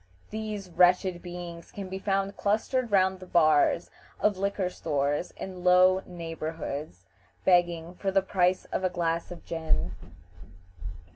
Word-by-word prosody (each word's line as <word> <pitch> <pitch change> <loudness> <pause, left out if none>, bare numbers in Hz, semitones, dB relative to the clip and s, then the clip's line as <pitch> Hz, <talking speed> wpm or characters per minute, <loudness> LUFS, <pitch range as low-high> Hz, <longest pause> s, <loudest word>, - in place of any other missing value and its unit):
These 210 -3 -5
wretched 180 0 +3
beings 175 -1 -8
can 200 -2 -6
be 190 +1 -5
found 195 0 -1
clustered 225 +4 0
round 190 -1 +3
the 185 - -11
bars 155 -1 +3 0.3
of 210 -1 +2
liquor 195 0 -1
stores 145 0 -1
in 185 -2 -7
low 185 +1 +6
neighborhoods, 160 - -6 0.4
begging 175 -2 +3
for 195 +2 -2
the 195 0 +2
price 185 -1 +1
of - - -1
a 185 - +2
glass 170 -1 -1
of 175 - -10
gin. 155 - -1
180 Hz, 135 wpm, -28 LUFS, 165-190 Hz, 0.4 s, low